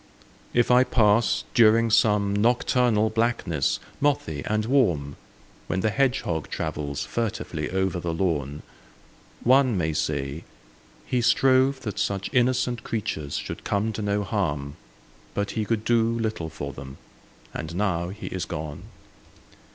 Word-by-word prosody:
If 120 0 +2
I 125 +1 +7
pass 115 -2 +3
during 115 0 +5
some 105 -2 +3
nocturnal 115 0 +2
blackness, 110 - 0 0.2
mothy 135 - 0
and 110 0 0
warm, 90 - +1 0.5
When 95 - -1
the 110 - +1
hedgehog 125 - 0
travels 75 -2 -3
furtively 105 -9 -3
over 95 -1 -1
the 85 -1 -3
lawn, 75 -5 -2 0.8
One 130 -3 +4
may 80 -3 0
say, 70 0 -2 0.6
"He 125 - 0
strove 130 +2 +3
that 110 -6 -5
such 100 +3 -2
innocent 125 -1 +1
creatures 80 -10 -3
should - - -6
come 105 +2 -1
to 110 - -4
no 105 0 0
harm, 75 -9 -2 0.6
But 100 0 -1
he 110 -2 -2
could 110 0 -1
do 120 -1 +3
little 110 -7 -1
for 70 -3 -6
them; 65 0 -9 0.6
and 80 +2 -5
now 90 -3 0
he 100 +3 -8
is 95 -2 -3
gone"? 75 -1 -6
105 Hz, 135 wpm, -25 LUFS, 80-115 Hz, 0.8 s, I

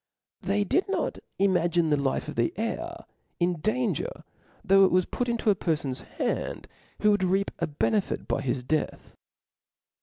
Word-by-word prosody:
They 200 +1 +1
did 365 - +1
not - - -1 0.2
imagine 175 -4 +2
the - - +5
life 135 -1 -1
of - - -4
the 115 0 +1
heir 330 +10 -3 0.3
in 175 -1 +1
danger, 250 - -1 0.4
though 195 -1 +6
it 190 - +6
was 185 0 +3
put 245 -1 -2
into 230 -2 +2
a - - +2
perfon's 150 -7 -1 0.2
hands - - -1 0.4
who 210 - +6
would 205 -2 +2
reap 195 +2 +1
a 170 - 0
benefit 185 +7 0
by 135 - 0
his 130 -1 -1
death. 155 +4 -2
190 Hz, 160 wpm, -27 LUFS, 160-215 Hz, 0.4 s, though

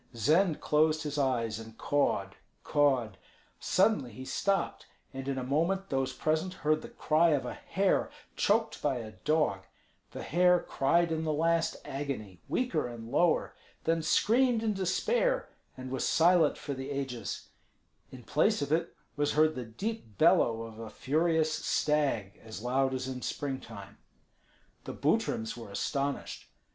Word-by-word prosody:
Zend 160 - +2
closed 155 +1 +2
his 150 -1 -3
eyes 115 -5 0
and 110 0 -11
cawed, 100 -9 0 0.3
cawed. 130 -9 +1 0.4
Suddenly 190 - +2
he 130 +4 -9
stopped, 195 +9 -1 0.3
and 135 0 -6
in 135 -1 -1
a 130 - -2
moment 170 +9 0
those 135 -1 0
present 160 +7 -1
heard 155 0 +3
the - - -9
cry 160 +2 +2
of 130 - -5
a 125 - -4
hare 195 +8 0 0.3
choked 220 +2 +1
by 145 -3 +1
a 115 -3 -6
dog; 150 -4 0 0.5
the - - -7
hare 180 +1 +4
cried 170 +3 +1
in 160 0 -1
the 155 - 0
last 165 +2 +1
agony, 130 -10 -5
weaker 175 - 0
and 115 -1 -9
lower, 170 +4 +2 0.3
then 165 0 +1
screamed 235 +6 +3
in 220 -1 +1
despair, 485 - 0 0.3
and 130 0 -7
was 130 - -2
silent 165 -2 +4
for 140 - -5
the 135 +1 -6
ages; 135 -6 -4 0.6
in 130 -2 -11
place 155 - +2
of 145 - -5
it 160 +2 0 0.2
was 145 0 0
heard 155 +1 +4
the 125 - -5
deep 115 - -5
bellow 115 +4 +4
of 115 -1 -10
a 115 -1 -7
furious 155 +5 +1
stag 145 -13 0
as 110 -1 -8
loud 130 +2 +1
as 130 0 -3
in 130 -1 -5
spring 135 0 -3
time. 100 -3 -11 0.9
The - - -6
Butryms 110 +1 0
were 115 -3 -9
astonished. 140 +7 -3
145 Hz, 155 wpm, -30 LUFS, 125-165 Hz, 0.9 s, hare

